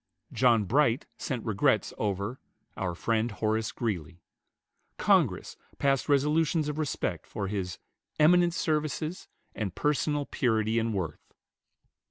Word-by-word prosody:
John 120 -4 +4
Bright 125 +3 +2
sent 125 -5 -3
regrets 105 -4 +2
over 100 +5 -2 0.4
"our 90 -3 -2
friend, 115 +4 0
Horace 110 +1 -1
Greeley." 90 -7 -4 0.7
Congress - - +2 0.2
passed 135 0 +1
resolutions 150 +2 +2
of 150 +1 -3
respect 155 -3 -2
for 100 -2 -4
his 95 -3 -3 0.4
"eminent 175 +2 +5
services 155 +2 -1 0.3
and 100 -5 -4
personal 145 0 0
purity 110 -4 +1
and 115 0 0
worth." 85 -6 -5
115 Hz, 115 wpm, -29 LUFS, 105-150 Hz, 0.7 s, eminent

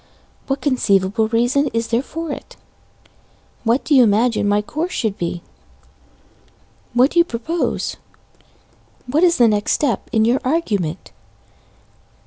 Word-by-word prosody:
What 270 0 -2
conceivable 220 -5 +1
reason 245 +6 +1
is 230 0 -1
there 230 +1 +1
for 325 +2 -6
it? - - -8 1.1
What 235 +4 +1
do 305 - +1
you 265 - +7
imagine 225 -1 +2
my 205 +1 +2
course 315 - -4
should 220 -5 -1
be? 170 -1 -4 1.5
What 255 +4 +4
do 345 - +2
you - - +7
propose? 325 +4 -3 1.1
What 280 +6 0
is 345 -1 +4
the 240 - +5
next 210 -1 +1
step 255 -8 -1
in 220 -1 +2
your 245 +3 +2
argument? 210 - -2
240 Hz, 130 wpm, -19 LUFS, 215-285 Hz, 1.5 s, you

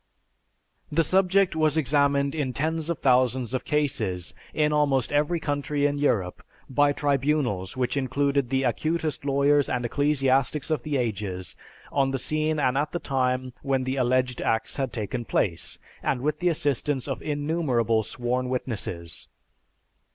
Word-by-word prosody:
_) - - -4
The 165 - +4
subject 190 +2 +3
was 155 0 +2
examined 140 -1 +2
in 145 -5 -2
tens 160 +3 -1
of 170 - 0
thousands 125 -1 +2
of 130 - -1
cases, 110 - -1 0.2
in 150 -1 +1
almost 140 -5 +2
every 150 +4 +2
country 145 -1 -1
in 145 0 +1
Europe, 95 -11 0 0.3
by 145 +2 +3
tribunals 140 -9 0
which 125 0 0
included 140 0 0
the 135 +1 +1
acutest 155 +4 -1
lawyers 140 +1 +3
and 125 -1 -1
ecclesiastics 135 +2 +1
of 155 -5 +1
the 145 +2 -1
ages, 95 - -2 0.4
on 135 -1 +2
the 135 - -1
scene 155 +4 0
and 130 -1 +2
at 150 +1 -2
the 175 - -1
time 130 -2 -1
when 135 -2 0
the 130 +1 -2
alleged 125 0 +1
acts 110 0 0
had 135 -3 -1
taken 120 +3 -3
place, 85 -7 -1 0.2
and 125 - -1
with 150 +2 -1
the 180 - +2
assistance 145 -3 0
of 135 - -3
innumerable 145 -7 0
sworn 125 +3 -2
witnesses. 95 -10 -4
135 Hz, 150 wpm, -26 LUFS, 125-150 Hz, 0.4 s, The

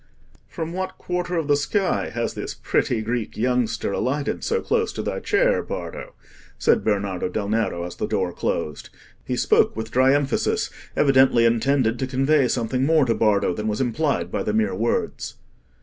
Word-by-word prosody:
"From 165 -1 -5
what 185 +1 -4
quarter 180 0 -3
of 160 -3 -1
the 145 - +4
sky 185 +6 0
has - - -2
this - - -5
pretty 115 -3 0
Greek 115 0 -3
youngster 115 -2 0
alighted 140 +7 -1
so 465 +2 +1
close 455 -1 0
to - - -4
thy - - -2
chair, - - +2
Bardo?" - - -7 0.4
said - - +2
Bernardo 100 -4 -1
del 100 0 -3
Nero, 110 -6 0
as 90 0 -6
the - - -2
door 95 -4 -1
closed. 75 -3 -3 0.3
He - - -2
spoke - - +3
with 110 +1 -5
dry 130 +2 +4
emphasis, 145 -1 0 0.3
evidently 130 -4 +5
intended 120 0 +2
to 130 - -1
convey 135 +1 +2
something 125 +1 -1
more 155 0 +4
to 115 - +2
Bardo 105 -5 +2
than 105 +4 -4
was 105 -1 -1
implied 125 - 0
by - - -1
the 105 - -1
mere 110 -2 +1
words. 115 +5 -2
125 Hz, 175 wpm, -23 LUFS, 110-145 Hz, 0.4 s, evidently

